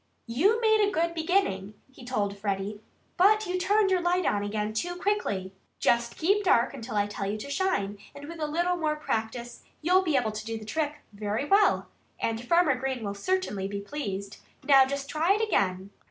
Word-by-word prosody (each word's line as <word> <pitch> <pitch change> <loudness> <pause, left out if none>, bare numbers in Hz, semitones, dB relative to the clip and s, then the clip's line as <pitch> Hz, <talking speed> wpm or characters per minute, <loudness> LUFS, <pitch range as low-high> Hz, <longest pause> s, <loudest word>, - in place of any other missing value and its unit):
"You 355 - +2
made 440 -1 +4
a 410 - +3
good 335 -2 0
beginning," 320 - 0 0.2
he 260 - -14
told 210 -5 -1
Freddie. 200 +1 -3 0.4
"But 425 +4 +5
you 365 0 -2
turned 400 +1 +3
your 370 -1 +3
light 350 0 +1
on 205 - +1
again 210 +1 -2
too 350 +11 -2
quickly. 355 - -1 0.3
Just 235 0 +1
keep 400 +6 +2
dark 245 -10 +3
until 245 -4 -7
I 205 -1 +2
tell 200 -1 -4
you 210 - -2
to 280 +7 -7
shine, 205 - -1 0.2
and 285 0 -9
with 335 0 -8
a 305 - -1
little 345 +4 0 0.2
practice 235 -3 -4 0.2
you'll 365 +3 +4
be 320 -7 +1
able 230 -4 0
to 215 0 -6
do 225 0 -4
the 215 - -9
trick 300 +4 -2
very 210 +5 -2
well. 400 +5 +3 0.3
And 225 +1 -2
Farmer 335 +2 +4
Green 260 -1 -3
will 200 -1 -3
certainly 205 - -1
be 200 0 -4
pleased. 200 -4 -5 0.3
Now, 270 -2 +6
just 280 0 -4
try 330 +7 +2
it 425 - -1
again!" 190 - 0
270 Hz, 195 wpm, -27 LUFS, -, 0.4 s, Now